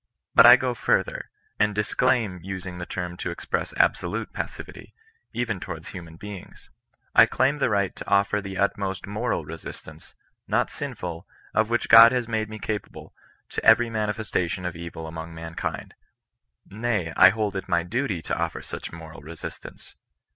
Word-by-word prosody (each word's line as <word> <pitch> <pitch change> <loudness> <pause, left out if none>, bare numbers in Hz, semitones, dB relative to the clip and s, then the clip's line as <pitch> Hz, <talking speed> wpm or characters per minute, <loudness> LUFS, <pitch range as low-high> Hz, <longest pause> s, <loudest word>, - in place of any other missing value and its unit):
But 115 - +9
I 120 - +11
go 130 -1 -1
further, 115 - 0 0.3
and 105 -1 +2
disclaim 105 -2 +1
using 95 0 -6
the 85 - -6
term 90 -1 -4
to - - -3
express - - -3
absolute - - +1
passivity, - - -7 0.4
even 115 -5 -2
towards 85 -3 -7
human 85 -4 -9
beings. 100 +1 -10 0.4
I - - +8
claim 140 +3 +1
the - - +2
right 100 -2 0
to - - -9
offer 100 +1 +2
the 95 -1 -6
utmost 100 -1 -1
Trwral 105 -4 -2
resistance, 80 0 -10 0.3
not - - +1
sinful, 85 -2 -5 0.3
of 110 0 +2
which 120 0 0
God 115 +1 +10
has 125 -2 0
made 110 -2 -1
me 110 - -7
capable, 105 -1 -5 0.4
to - - -4
every 115 +1 +6
manifesta 105 -4 -1
tion 90 +2 -4
of 90 -1 -3
evil 85 -1 -7
among 80 +1 -7
mankind. 80 0 -5 0.7
Nay, 105 -5 -2
I 95 - +9
hold 105 0 -1
it 95 - -5
my 85 -1 +2
duty 105 -2 -2
to - - -2
offer - - -3
such - - -7
moral 80 -3 -10
resistance. 80 +2 -10
100 Hz, 160 wpm, -25 LUFS, 85-110 Hz, 0.7 s, I